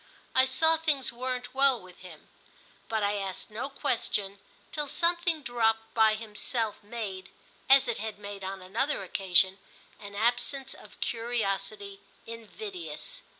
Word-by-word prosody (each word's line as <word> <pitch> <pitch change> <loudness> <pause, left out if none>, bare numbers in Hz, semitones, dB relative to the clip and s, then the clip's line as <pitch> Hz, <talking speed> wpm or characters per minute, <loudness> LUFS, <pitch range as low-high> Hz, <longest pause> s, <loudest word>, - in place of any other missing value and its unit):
I 260 - +6
saw 320 +5 +4
things 295 -6 +1
weren't 250 0 -3
well 270 -2 +4
with 180 -1 -15
him, 175 -4 -12 0.6
but 220 -2 +1
I 205 +1 +2
asked 195 +1 -4
no 235 +6 -3
question 200 -7 -1 0.3
till 295 -1 -2
something 340 0 +1
dropped 225 -2 +1
by 220 -1 +5
himself 220 0 -2
made, 205 -4 -5 0.4
as 270 0 +8
it 235 - -1
had 220 0 -4
made 200 -1 -7
on 190 0 -4
another 215 +6 0
occasion, 190 0 +3 0.4
an 200 -1 -9
absence 245 +5 0
of - - -15
curiosity 200 -3 -1 0.2
invidious. 365 - -7
225 Hz, 135 wpm, -30 LUFS, 200-265 Hz, 0.6 s, as